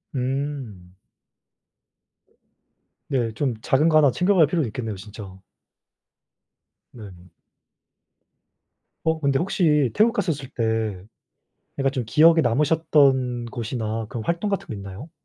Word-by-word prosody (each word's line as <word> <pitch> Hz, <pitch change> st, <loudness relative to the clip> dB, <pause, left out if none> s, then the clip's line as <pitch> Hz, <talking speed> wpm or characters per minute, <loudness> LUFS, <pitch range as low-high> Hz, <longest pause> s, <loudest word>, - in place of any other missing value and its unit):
음. 130 Hz, -8 st, -4 dB, 2.2 s
네. 120 Hz, -4 st, 0 dB
좀 130 Hz, 0 st, -1 dB
작은 150 Hz, +5 st, +3 dB
거 155 Hz, -, +4 dB
1 145 Hz, -3 st, +5 dB
챙겨갈 180 Hz, +2 st, +3 dB
필요도 155 Hz, -2 st, -1 dB
있겠네요 110 Hz, -1 st, -5 dB
진짜. 95 Hz, -1 st, -11 dB, 1.5 s
네. 95 Hz, -6 st, -13 dB, 1.7 s
어 160 Hz, 0 st, +1 dB
근데 140 Hz, -1 st, +1 dB
혹시 155 Hz, -, +1 dB
태국 225 Hz, +2 st, +4 dB
갔었을 145 Hz, -, -3 dB
때 110 Hz, -6 st, -2 dB, 0.8 s
약간 135 Hz, 0 st, +1 dB
좀 130 Hz, -3 st, -3 dB
기억에 160 Hz, +7 st, +5 dB
남으셨던 135 Hz, -3 st, +2 dB
곳이나 115 Hz, -2 st, -4 dB
그런 110 Hz, +1 st, -6 dB
활동 170 Hz, +5 st, -1 dB
같은 195 Hz, -, -2 dB
게 -, -, -6 dB
있나요? 100 Hz, -, -9 dB
130 Hz, 210 characters per minute, -23 LUFS, 110-155 Hz, 2.2 s, 1